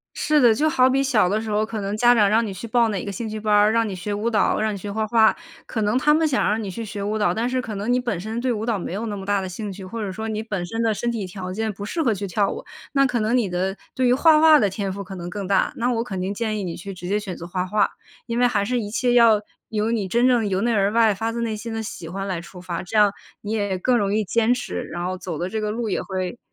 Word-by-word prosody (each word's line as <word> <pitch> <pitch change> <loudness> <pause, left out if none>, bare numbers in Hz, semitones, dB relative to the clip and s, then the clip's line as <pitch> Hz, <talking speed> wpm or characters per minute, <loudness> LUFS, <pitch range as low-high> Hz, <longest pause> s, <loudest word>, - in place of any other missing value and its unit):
是 300 -1 +2
的， 235 -3 +6
就 310 +7 +2
好 260 -4 +4
比 270 +1 +2
小 245 -9 +3
的 210 +4 0
时 220 - -5
候， 210 +1 +1
可 220 -1 -5
能 200 +1 -3
家 240 +2 +5
长 210 -3 +4
让 225 +2 +3
你 200 - -4
去 205 +5 -7
报 235 0 +3
哪 200 -4 -2
个 200 - -5
兴 220 +4 -5
趣 215 0 -5
班 215 0 0
儿， 210 +1 +5
让 230 -1 +2
你 195 - -4
学 185 +3 -4
舞 210 +3 -1
蹈、 215 -2 +2
让 215 0 0
你 - - -4
学 200 +1 -6
画 220 0 -1
画。 220 0 +4 0.3
可 225 - -3
能 210 +4 +1
他 300 +3 +4
们 315 0 +3
想 275 - +1
让 215 +1 +1
你 195 - -4
去 230 +4 -5
学 205 -1 -6
舞 210 +2 -1
蹈， 210 - +2
但 230 +3 -1
是 255 0 -1
可 215 -4 -6
能 210 +4 -2
你 250 - +3
本 235 -8 -2
身 220 +4 -4
对 250 +1 0
舞 220 -1 -3
蹈 225 -4 0
没 175 - -5
有 220 +4 -3
那 205 - -4
么 195 - -7
大 200 0 +1
的 190 - -4
兴 200 +2 -5
趣， 190 0 -9
或 225 +4 -5
者 195 -2 -3
说 220 +3 -5
你 215 0 -2
本 200 -5 -3
身 225 +5 -3
的 225 -1 +2
身 235 +3 -2
体 220 -4 -3
条 185 0 -6
件 220 +2 -2
不 205 +1 -7
适 325 +9 -2
合 240 -7 +2
去 200 0 -3
跳 195 +2 +1
舞。 - - -6 0.3
那 275 -1 +4
可 245 -2 -1
能 220 +3 +1
你 230 -6 +1
的 185 +2 -2 0.2
对 255 -1 +1
于 245 - +4
画 310 +4 +5
画 315 -1 +7
的 205 -6 +3
天 195 0 -3
赋 200 - -5
可 195 0 -9
能 175 -1 -6
更 200 0 -5
大， 195 - +2
那 245 +1 0
我 230 -1 0
肯 190 -6 -5
定 190 +2 -2
建 215 -1 -2
议 200 - -3
你 170 -2 -4
去 195 +3 -7
直 180 -1 -8
接 205 +2 +1
选 195 -4 -5
择 170 - -8
画 180 +1 -2
画。 210 +3 +2 0.4
因 235 0 -2
为 245 - +5
还 210 -4 +1
是 245 +1 0
一 205 -2 -5
切 245 +2 +1
要 230 -3 +6 0.3
由 215 +1 0
你 215 -5 0
真 240 +6 +3
正 240 -4 +3
由 190 -1 0
内 235 +2 +1
而 200 0 +2
外 225 -2 +4
发 225 +4 -2
自 235 - -3
内 225 -2 -2
心 230 +2 -6
的 225 0 -3
喜 175 -5 -7
欢 195 +2 -4
来 185 -3 -2
出 180 0 -12
发， 175 -1 -4
这 215 +4 -2
样 210 -1 +6 0.3
你 210 +1 -5
也 205 -3 -1
更 245 +6 +2
容 200 -2 +1
易 220 - +2
坚 230 +4 +2
持， 250 - -3
然 175 +1 -5
后 185 +1 -2
走 180 -4 -5
的 175 - -2
这 220 +3 -3
个 210 - -1
路 225 +1 -2
也 195 - -1
会， 185 +4 -4
215 Hz, 345 characters per minute, -23 LUFS, 195-235 Hz, 0.4 s, 画